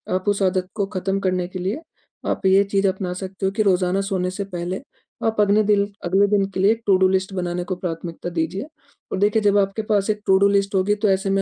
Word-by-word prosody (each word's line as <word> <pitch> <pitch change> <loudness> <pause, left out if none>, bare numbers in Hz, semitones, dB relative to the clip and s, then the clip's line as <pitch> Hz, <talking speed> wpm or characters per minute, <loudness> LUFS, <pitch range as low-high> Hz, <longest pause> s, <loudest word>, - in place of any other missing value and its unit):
आप 185 +2 -3
उस 205 0 0
आदत 185 -1 +1
को 205 -2 0
खत्म 195 +1 -1
करने 185 -2 -1
के 185 +1 -7
लिए 195 - -2 0.5
आप - - -2
ये 190 +1 +5
चीज़ 200 0 +1
अपना 190 -1 -2
सकते 190 +1 -5
हो 190 - +1
कि 215 +2 -1
रोज़ाना 185 -1 +2
सोने 190 -2 -1
से 200 +2 -4
पहले, 180 0 -5 0.4
आप 225 -1 0
अगने 205 +1 +4
दिल 205 -1 +3 0.2
अगले 190 +3 +3
दिन 200 -1 +2
के - - -3
लिए 200 +3 +5
टू-डू 190 -2 +4
लिस्ट 190 +1 0
बनाने 180 -1 -2
को 185 +1 -3
प्राथमिकता 170 -1 -5
दीजिए 170 - -2 0.5
और - - -1
देखिए, 210 +2 +3
जब 205 -1 +3
आपके 195 +2 +1
पास 205 -1 +2
एक 210 0 0
टू-डू 190 +1 +5
लिस्ट 200 0 +1
होगी, 195 +2 +2
तो 210 +1 0
ऐसे 195 0 +1
में 195 0 +2
195 Hz, 230 wpm, -22 LUFS, 185-200 Hz, 0.5 s, ये